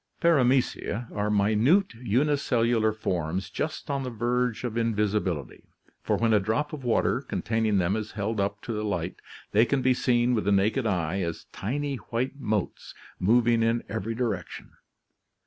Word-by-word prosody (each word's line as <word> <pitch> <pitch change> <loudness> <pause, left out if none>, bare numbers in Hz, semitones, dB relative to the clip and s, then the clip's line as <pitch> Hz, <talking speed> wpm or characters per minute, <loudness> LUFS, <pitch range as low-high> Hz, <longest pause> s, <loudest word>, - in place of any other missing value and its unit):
— - - -40
Paramecia 130 -6 +2
' - - -12
are 105 0 0
minute 110 - +3
unicellular 120 -2 +1
forms 95 -3 -3
just 155 +2 -4
on 140 -1 -1
the 130 - -3
verge 120 +1 -1
of 120 -3 -3
invisibility, 105 - -1 0.4
for - - 0
when 115 -1 +2
a 105 - +5
drop 125 +10 -1
of 145 -3 -6
water 120 -2 +1
containing 110 -2 0
them 95 +2 +1
is 110 -1 -4
held 105 +2 -2
up 100 +1 -1
to 115 - -4
the 105 0 -2
light, 90 -4 -2 0.3
they 110 +2 +5
can 130 +2 0
be 130 - +4
seen 120 0 +2
with 110 -4 0
the 100 - +2
naked 110 +5 +2
eye 90 -2 -1
as 85 -2 -4
tiny 140 +5 -3
white 125 +3 -3
motes 105 -7 -3 0.2
moving 115 +4 +3
in 115 +1 +1
every 110 +1 -3
di 125 - -1
rection. 100 -8 -4
115 Hz, 170 wpm, -27 LUFS, 100-125 Hz, 0.4 s, a